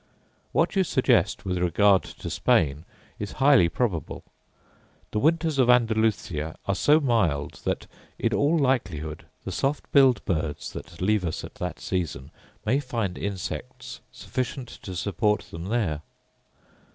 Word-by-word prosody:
What - - +1
you 190 - +4
suggest, - - +2
with 90 -1 -1
regard 95 +3 +4
to - - -8
Spain, 75 +1 +2 0.3
is 105 -1 -5
highly 135 -10 +5
probable. 90 - -2 0.9
The 105 - 0
winters 160 +1 +2
of 125 -2 +4
Andalusia 110 -9 +2
are 100 - +1
so 150 - +4
mild, 110 - 0
that, - - -1 0.3
in - - 0
all 150 +4 +3
likelihood, 95 - -1 0.2
the - - -3
soft 140 +2 -1
billed 135 -3 +5
birds 80 -5 -2
that 85 +1 -9
leave 105 0 +2
us 80 -3 -3
at - - -9
that - - -3
season 80 -6 -3 0.3
may 125 +6 +2
find 115 -9 -2
insects 95 -9 -5
sufficient 130 0 -4
to 95 - -7
support 105 +3 +1
them 85 +1 -6
there. 95 -9 -1
105 Hz, 140 wpm, -26 LUFS, 85-130 Hz, 0.9 s, highly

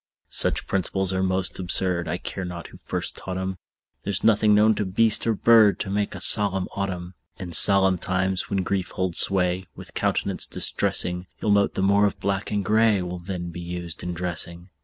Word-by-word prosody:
Such - - +1
principles 95 0 0
are 95 - -1
most 95 0 -1
absurd, 90 -1 0
I 85 +2 -2
care 95 - -6
not 90 -1 -7
who - - -15
first - - -4
taught 95 -1 -6
'em; 95 0 -4 0.4
There's 100 -1 -4
nothing 105 -1 +4
known 110 +1 +4
to 105 - -2
beast 110 +4 +1
or 115 - +2
bird 110 -1 +5
To 95 - -4
make 100 0 -2
a - - -7
solemn 95 -2 +3
autumn. 95 -2 -4 0.2
In 90 -2 -8
solemn 95 +2 +5
times, 95 +1 -2
when 95 -1 -1
grief 95 -1 -2
holds 95 -2 0
sway 90 -1 +2
With - - -12
countenance - - -1
distressing, 90 +1 -1
You'll 105 - 0
note 100 0 +2
the 95 - -1
more 100 +1 +4
of 100 - -6
black 100 +1 -2
and 100 -2 -2
gray 110 -1 +2
Will 90 0 -6
then 85 -1 -6
be 85 - -8
used 85 -2 -7
in 90 0 -5
dressing. 85 0 -5
95 Hz, 195 wpm, -24 LUFS, 90-100 Hz, 0.4 s, bird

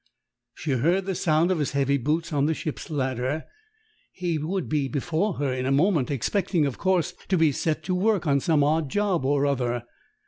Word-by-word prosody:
She 155 - -4
heard 170 +9 +2
the 190 - -1
sound 165 0 +2
of 180 - 0
his 145 - -1
heavy 140 0 +2
boots 160 +5 -1
on 145 0 +2
the 160 - +1
ship's 155 - -5
ladder: 130 0 -1 0.7
he 175 -3 -2
would 180 +4 -2
be 150 -3 0
before 165 +7 -1
her 140 -2 -1
in 130 0 -2
a - - +1
moment, 150 -2 +2
expecting, 160 - 0
of 140 - -3
course, 185 -2 +1
to 190 - +2
be 160 -2 +4
set 155 +3 -1
to 185 - -2
work 195 0 +1
on 140 -2 +3
some 150 0 +2
odd 155 0 +1
job 200 -3 0
or 140 +1 +2
other. 125 -4 0
155 Hz, 200 wpm, -25 LUFS, 140-175 Hz, 0.7 s, be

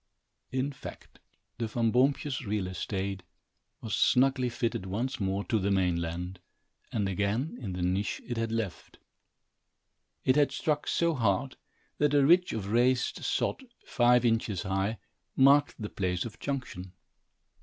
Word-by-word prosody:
In 130 +2 -1
fact, - - -11 0.4
the 115 - -1
Van 115 0 0
Boompjes 135 +2 +1
real 105 -3 -1
estate 95 +1 -3 0.6
was 110 - -5
snugly 130 -1 +3
fitted 115 -5 -2
once 120 +8 -2
more 100 0 -1
to 110 0 0
the 100 +1 0
mainland, 90 -1 -1 0.5
and 105 -3 0
again 105 - -1
in 100 -6 -4
the 90 0 -3
niche 95 +3 0
it 120 - -4
had 115 -1 -2
left. 115 -5 -4 1.3
It 130 - +4
had 145 -1 +4
struck 150 -1 -1
so 170 -1 +2
hard, 120 0 0 0.4
that 145 0 +3
a 140 -1 +5
ridge 180 +4 +5
of 105 -2 -4
raised 125 +2 +2
sod, - - -1 0.2
five 125 -1 +3
inches 115 -4 +1
high, 95 +3 -1 0.4
marked 140 +2 +5
the 105 - -4
place 90 -3 -2
of 115 - -8
junction. 110 -10 -5
115 Hz, 145 wpm, -29 LUFS, 95-130 Hz, 1.3 s, a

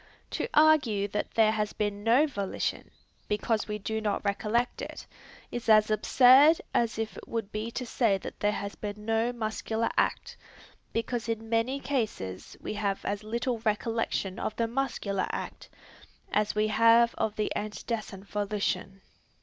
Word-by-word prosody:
To - - -2
argue 280 -10 +4
that 210 - -2
there 220 -1 +5
has 210 -1 -1
been 205 -1 -2
no 240 +7 +5
volition, 200 -10 -3 0.4
because 215 +1 0
we 210 0 -3
do 220 +2 -3
not 210 -1 -1
recollect 215 +4 0
it, - - -7 0.5
is 240 -1 -4
as 215 0 +6
absurd 265 +8 +6
as 235 -1 +1
it 225 -1 -3
would 225 -3 -3
be 215 +2 -3
to 250 +2 -4
say 225 -4 +2
that - - -9
there 205 - +2
has 200 -1 -4
been 210 0 -7
no 225 +2 +1
muscular 225 -1 -2
act, - - -1 0.5
because 230 0 -2
in 225 0 -3
many 235 +4 +1
cases 215 - -3
we - - -5
have 200 -2 -2
as 205 +1 -2
little 235 +2 -2
recollection 220 -2 -1
of 215 - -3
the 230 - +1
muscular 230 -6 -1
act, - - -6 0.6
as 210 0 +1
we 215 0 +2
have 230 +2 +5
of 215 -1 0
the 215 - -1
antecedent 210 -1 -4
volition. 200 -2 -2
220 Hz, 155 wpm, -29 LUFS, 210-235 Hz, 0.6 s, as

